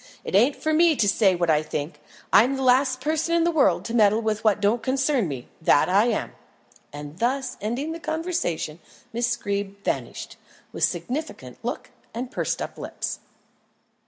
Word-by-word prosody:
"It - - -6
ain't 240 +9 +4
for 315 0 -1
me 330 0 +5
to 215 - +2
say 195 -1 +3
what 175 -2 +1
I 150 -1 +3
think. 150 0 -5 0.3
I - - +8
am 265 +3 0
the 265 - -3
last 255 0 +3
person 315 +3 0
in 335 - +3
the 345 - +2
world 315 -4 +2
to 230 - -4
meddle 215 -2 +4
with 220 -2 -2
what 215 -2 +3
don't 210 +3 +2
concern 265 - +1
me 130 -5 -6
that 155 0 +4
I 200 +4 +4
am." 230 - -1 0.6
And 145 +3 -9
thus 255 +2 -1
ending 245 +9 -2
the 330 - -5
conversation, 315 - -2 0.3
Miss 240 +1 0
Greeb 200 0 -4
vanished, - - -4 0.3
with - - -4
significant 300 +6 -3
look - - -4 0.2
and 245 +2 -4
pursed - - -2
up - - -8
lips. - - -4
235 Hz, 180 wpm, -24 LUFS, 200-275 Hz, 0.6 s, I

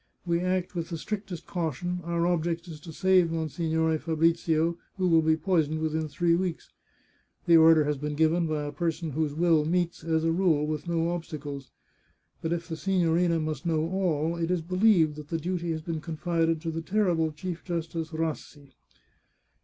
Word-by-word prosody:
We 170 -1 +1
act 185 0 -1
with 170 -1 -4
the 170 - -4
strictest 195 -1 -5
caution; 175 +1 -3
our 170 0 0
object 170 0 -1
is 160 -3 -8
to 165 +2 -10
save 185 +1 +3
Monsignore 160 0 0
Fabrizio, 165 +1 +1 0.2
who 185 -1 +1
will 165 -2 +5
be 160 0 +2
poisoned 160 -3 +1
within 160 0 -1
three 170 +3 +1
weeks. 175 -1 -2 0.7
The 170 -2 +7
order 160 -1 +7
has 145 -1 -1
been 150 +1 -3
g^ven 160 +2 +2
by 150 -1 -1
a 145 - -4
person 165 +1 -2
whose 150 0 -1
will 165 -2 +3
meets, 170 +1 -1
as 160 -1 0
a 165 - +2
rule, 165 -4 +2
with 155 +2 -4
no 170 0 0
obstacles. 145 -5 -6 0.7
But 160 - -2
if 170 -1 -2
the 165 -2 -5
signorina 175 -2 +2
must 155 -3 -3
know 160 -1 +1
all, 170 -4 0
it 165 0 -1
is 180 -2 +1
believed 180 -4 +3
that 150 -1 -8
the 165 - -2
duty 175 +1 -3
has 160 -1 -3
been 165 -2 -4
confided 165 0 -1
to 165 - -3
the 165 +1 -4
terrible 170 -4 +1
Chief 170 +2 -6
Justice 165 -2 -3
Rassi 155 -3 -5
165 Hz, 180 wpm, -27 LUFS, 155-175 Hz, 0.7 s, The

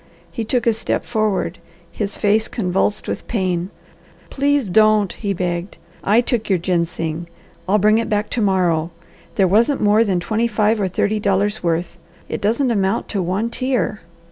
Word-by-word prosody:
He 230 - -3
took 240 +2 0
a 230 - +4
step 225 - -2
forward, 215 -6 -1 0.3
his 205 -2 -4
face 215 +2 +2
convulsed 195 -1 -1
with - - -4
pain. 185 -5 -1 0.6
"Please 285 -3 +1
don't!" 215 0 +3
he 205 -3 -3
begged. 175 0 -3 0.3
"I 215 +4 +4
took 240 -3 -1
your 190 - +3
ginseng. 170 -2 -2 0.4
I'll 205 - +4
bring 215 +2 +4
it 230 - -2
back 210 0 -1
to 240 - -1
morrow. 175 -5 +1 0.5
There 195 -2 +3
wasn't 230 +9 +3
more 210 +2 +4
than 190 -5 0
twenty 220 +6 0
five 215 -1 +1
or 195 - +1
thirty 205 +3 0
dollars' 205 +1 0
worth. 170 0 -2 0.3
It - - -4
doesn't 235 +5 +1
amount 200 0 0
to 200 - -1
one 190 +6 -1
tear." 255 -4 -1
205 Hz, 170 wpm, -20 LUFS, 185-225 Hz, 0.6 s, a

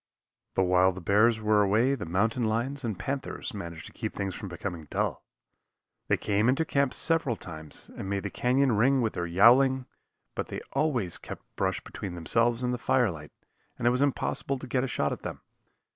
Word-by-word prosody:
But 95 - +3
while 90 +1 +4
the 95 - -8
bears 105 +5 +3
were 105 -1 +3
away 110 +7 +3
the 110 -10 -4
mountain 110 +8 +1
lions 120 +6 0
and 110 -5 -2
panthers 135 0 -4
managed 85 -6 -7
to - - -10
keep - - -5
things 100 -1 -3
from 100 - -6
becoming 85 -2 -6
dull. - - -1 0.8
They - - +3
came 105 +3 +1
into 135 +5 +2
camp 140 -3 +1
several 165 -7 +1
times 80 -6 -9
and 95 - -5
made 100 -1 -1
the 100 - -4
canyon 130 +2 +2
ring 125 +5 +3
with 110 - 0
their 85 - -2
yowling, 125 +8 +5 0.5
but - - -3
they - - -5
always 125 - 0
kept - - -9
brush - - -1
between 90 -3 -6
themselves 115 +8 +1
and 125 0 0
the 125 - -3
fire 125 -3 +2
light, 75 -2 -10 0.5
and 120 - -4
it 120 - +5
was 125 +2 0
impossible 140 0 0
to 130 - -8
get 125 0 0
a - - 0
shot 75 - 0
at - - -5
them. - - -6
110 Hz, 200 wpm, -28 LUFS, 95-130 Hz, 0.8 s, yowling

